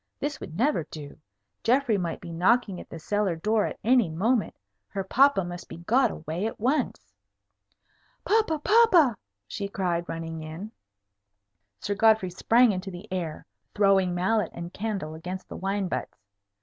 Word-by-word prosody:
This 290 0 -3
would 160 - -8
never 270 - +2
do. 145 -2 -9 0.5
Geoffrey 245 -1 +3
might 175 -4 -2
be 175 - -8
knocking 190 +3 +2
at - - -14
the - - -8
cellar 200 +2 0
door 210 +6 +1
at - - -6
any 240 -5 +4
moment. 215 +9 0 0.3
Her 195 -1 -4
papa 265 +1 +4
must 175 0 -7
be - - -8
got 235 +10 +2
away 160 +6 -4
at - - -7
once. 260 +5 -1 1.1
"Papa! 430 -7 +2
papa!" 355 - +5 0.3
she 200 - -4
cried, 175 -3 -2
running 165 -1 -5
in. 160 +7 -7 1.1
Sir 205 - -2
Godfrey 215 -3 +3
sprang 230 +6 +4
into 190 0 -4
the 185 +3 -9
air, 170 -4 -4 0.3
throwing 195 -3 +3
mallet 190 +2 +1
and 170 +1 -7
candle 200 -7 -3
against 180 +4 -7
the - - -8
wine 195 +1 -1
butts. - - -4
195 Hz, 155 wpm, -26 LUFS, 175-230 Hz, 1.1 s, papa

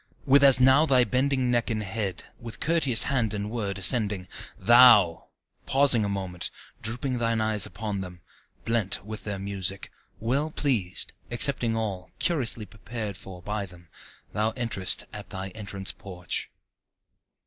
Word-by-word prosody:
with 140 0 +4
as 135 -2 +7
now 130 +3 +5
thy 130 -5 +3
bending 130 +2 0
neck 120 0 0
and 110 -2 -2
head, 95 -2 -4 0.2
with 120 -2 -9
courteous 150 -8 +5
hand 115 -6 -1
and 105 +1 -5
word, 100 -5 -3
ascending, 100 -2 +2 0.3
Thou! 120 -8 +5 0.4
pausing 135 -5 +5
a 100 - -2
moment, 95 -3 -4 0.3
drooping 125 +3 -3
thine 115 -1 0
eyes 110 -2 +1
upon 105 0 -5
them, 90 -2 -9 0.5
blent 105 -4 -1
with 110 0 -8
their 105 -2 -4
music, 95 -1 -3 0.3
Well 135 +8 -1
pleased, 120 - -2 0.2
accepting 120 -1 +1
all, 100 -5 -4
curiously 125 -10 +2
prepared 110 -1 -7
for 90 -2 -11
by 105 -1 -4
them, 85 -2 -17 0.4
Thou 105 +3 0
enterest 115 -7 0
at - - -9
thy 95 +1 -6
entrance 100 -1 -4
porch. 90 -3 -6
110 Hz, 145 wpm, -25 LUFS, 95-125 Hz, 0.5 s, as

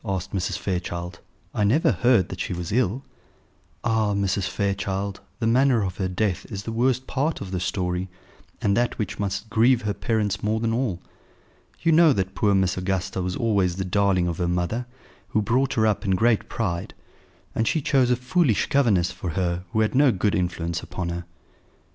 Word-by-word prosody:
asked 95 -4 -3
Mrs. 95 -1 -1
Fairchild. 90 -1 -4 0.3
"I 105 - 0
never 120 +11 +3
heard 120 -7 +3
that 90 - -7
she 90 - -2
was 85 -1 -4
ill." 125 +2 +1 0.8
"Ah! 110 -3 +1
Mrs. 100 -1 0
Fairchild, 100 0 -2 0.2
the 115 - -2
manner 125 0 +3
of 95 -2 -4
her 95 - -1
death 95 +1 -1
is 100 -2 -5
the 115 - -4
worst 125 +2 +1
part 145 +5 -1
of 95 -2 -7
the 90 - -1
story, 90 0 -2 0.5
and 100 -1 +3
that 120 0 0
which 105 -4 -3
must 100 +2 -3
grieve 120 +2 +4
her 105 -1 0
parents 105 -3 -1
more 110 +1 0
than 115 0 0
all. 115 -8 -1 0.8
You 165 - +4
know 160 -2 +6
that 95 -4 -2
poor 100 -2 +2
Miss 95 -1 +1
Augusta 95 0 -2
was 90 0 -2
always 100 -6 +1
the 95 0 -3
darling 95 -1 +2
of 85 0 -3
her 90 - +1
mother, 90 +8 -1 0.4
who 110 - +1
brought 130 +5 +1
her 110 -3 +3
up 105 -2 +1
in 95 -3 +2
great 115 +2 +2
pride; 85 -7 -3 0.6
and 115 - 0
she 160 - +2
chose 135 -3 +2
a 125 - +4
foolish 125 - +1
governess 100 -10 +3
for 90 - -5
her 90 +1 -1
who 110 - +1
had 110 - +1
no 135 0 +5
good 100 0 0
influence 85 -1 -1
upon 90 -2 -5
her." 85 0 -4
100 Hz, 190 wpm, -24 LUFS, 90-115 Hz, 0.8 s, know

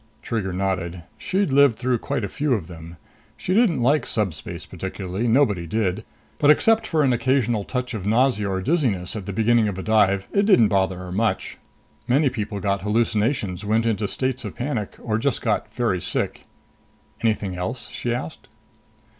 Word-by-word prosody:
Trigger 105 -5 -2
nodded. 90 -2 -2 0.2
She'd 190 -6 0
lived 140 -5 +5
through 125 -1 0
quite 115 - -3
a - - -1
few 145 +7 -1
of 100 -8 -1
them. 85 -1 -11 0.4
She 185 - -2
didn't 195 - +3
like 145 +5 +2
subspace 85 -4 -3
particularly 95 +4 -4
nobody 110 -9 +2
did 105 +1 -1 0.4
but 145 - +4
except 225 +8 +4
for 155 -2 +2
an 130 -3 +3
occasional 120 -3 +1
touch 125 +2 -3
of 100 -3 -4
nausea 115 -2 +2
or 95 -1 -1
dizziness 120 - 0
at 105 -3 -6
the - - -2
beginning 110 +2 +3
of 100 -3 -3
a 95 - -5
dive, 100 -3 +2
it 200 0 +2
didn't 120 - +6
bother 95 -2 +1
her 90 0 -8
much. 110 +4 -1 0.5
Many 135 +2 +3
people 105 -4 -4
got 100 -1 -1
hallucinations, 105 -2 0
went 110 +2 +1
into 110 -2 0
states 130 +4 -2
of - - -6
panic 120 -5 -3
or 110 -2 0
just 140 +4 0
got 110 -1 -1
very 110 -6 0
sick. - - -2 0.7
"Anything 105 -4 0
else?" 90 +8 -3
she 120 - -3
asked. 100 -10 -5
110 Hz, 175 wpm, -23 LUFS, 95-125 Hz, 0.7 s, didn't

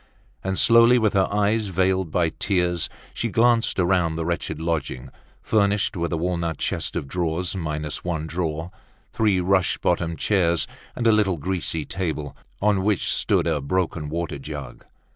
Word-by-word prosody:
And 95 0 -1
slowly, 115 +1 +6
with 110 -3 +2
her 95 -2 +3
eyes 105 +1 +1
veiled 95 -1 +1
by 85 +1 +1
tears, 90 -3 0 0.2
she 120 - -2
glanced 115 +1 +3
round 90 -3 +2
the 80 - -2
wretched 85 -2 -2
lodging, 80 -6 -3 0.3
furnished 105 -1 +1
with 85 -1 -2
a 85 - 0
walnut 85 -1 -1
chest - - -2
of - - -3
drawers, 85 +3 -1
minus 75 -4 -3
one 80 -3 -2
drawer, 80 0 -3 0.4
three 105 -4 +2
rush 95 0 +2
bottomed 85 -1 0
chairs, 85 -5 +2 0.3
and 120 - -3
a 115 - +6
little 105 -5 +2
greasy 85 -2 -2
table, 80 -5 -3 0.3
on 105 -2 +3
which 100 -1 +1
stood - - +1
a 80 -4 0
broken 80 0 -1
water 85 -2 -3
jug. 75 0 -8
90 Hz, 160 wpm, -23 LUFS, 80-100 Hz, 0.4 s, slowly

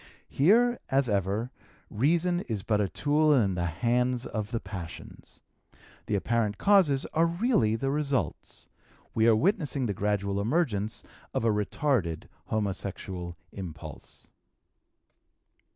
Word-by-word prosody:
Here, 235 - +4
as 135 -1 +2
ever, 100 +4 -1 0.4
reason 170 +9 +2
is 105 -4 -2
but 105 -1 +1
a 100 - 0
tool 150 - +2
in 105 -7 +2
the 85 -1 -1
hands 120 +7 0
of 105 -2 -4
the 115 -1 -2
passions. 90 -7 -9 0.7
The 105 - 0
apparent 105 0 0
causes 180 -10 +4
are 165 +1 +3
really 170 - +2
the 135 +4 -1
results; 140 - -2 0.5
we 110 0 +3
are 115 - +6
witnessing 150 - +1
the 105 - -1
gradual 100 0 -1
emergence 110 - 0 0.3
of - - 0
a - - +4
retarded 105 - 0 0.2
homosexual 95 -4 -3
impulse. 80 -6 -9
115 Hz, 120 wpm, -28 LUFS, 100-145 Hz, 0.7 s, are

